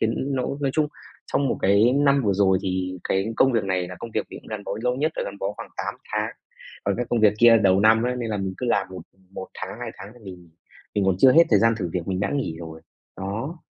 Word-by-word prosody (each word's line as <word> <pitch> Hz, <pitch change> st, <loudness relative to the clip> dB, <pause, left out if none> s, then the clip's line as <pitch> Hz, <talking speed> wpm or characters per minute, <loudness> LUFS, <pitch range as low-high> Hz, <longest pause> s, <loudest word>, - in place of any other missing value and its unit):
khiến 130 Hz, +5 st, -1 dB
nó 130 Hz, -, 0 dB, 0.2 s
nói 140 Hz, -2 st, 0 dB
chung 155 Hz, -1 st, +2 dB, 0.4 s
trong 140 Hz, -, +2 dB
một -, -, -1 dB
cái 100 Hz, +5 st, +4 dB
năm 140 Hz, 0 st, +3 dB
vừa 105 Hz, -4 st, +2 dB
rồi 95 Hz, -1 st, +3 dB
thì 95 Hz, -1 st, -2 dB
cái 95 Hz, +4 st, 0 dB
công 135 Hz, -, +4 dB
việc 115 Hz, -4 st, +1 dB
này 90 Hz, -2 st, -1 dB
là 90 Hz, -, -8 dB
công 115 Hz, -, -7 dB
việc -, -, -2 dB
mình -, -, -9 dB
cũng -, -, -15 dB
gắn 105 Hz, -2 st, -6 dB
bó -, -, -4 dB
lâu 125 Hz, 0 st, 0 dB
nhất, 155 Hz, +4 st, 0 dB
là -, -, -1 dB
gắn 100 Hz, -, -7 dB
bó 100 Hz, +1 st, -2 dB
khoảng -, -, -8 dB
8 -, -, -3 dB, 0.2 s
tháng. -, -, -1 dB, 0.5 s
Còn 100 Hz, 0 st, 0 dB
cái 120 Hz, -1 st, -2 dB
công 120 Hz, -, +1 dB
việc 105 Hz, -1 st, +5 dB
kia 115 Hz, 0 st, +7 dB
đầu 95 Hz, -2 st, +3 dB
năm 110 Hz, +2 st, +5 dB
ấy 125 Hz, +1 st, -1 dB
nên 120 Hz, -2 st, -3 dB
là 105 Hz, -, -1 dB
mình 95 Hz, -1 st, -3 dB
cứ 125 Hz, -, -3 dB
làm 100 Hz, -5 st, +1 dB
một 95 Hz, -, -8 dB, 0.3 s
một 95 Hz, -, -6 dB
tháng, 120 Hz, -, -7 dB
hai 120 Hz, -2 st, -4 dB
tháng 95 Hz, -, -9 dB
thì 120 Hz, -, -17 dB
mình 90 Hz, -3 st, -11 dB, 0.5 s
mình 100 Hz, -, +1 dB
còn 95 Hz, -1 st, +3 dB
chưa 130 Hz, +5 st, +7 dB
hết 165 Hz, +4 st, +7 dB
thời 105 Hz, -, +6 dB
gian 115 Hz, 0 st, +4 dB
thử 90 Hz, -4 st, -3 dB
việc 90 Hz, -1 st, -3 dB
mình 95 Hz, -1 st, -1 dB
đã 100 Hz, -, 0 dB
nghỉ 130 Hz, -, -2 dB
rồi. 80 Hz, -1 st, -9 dB, 0.4 s
Đó. 110 Hz, -, -4 dB
105 Hz, 275 wpm, -24 LUFS, 95-125 Hz, 0.5 s, kia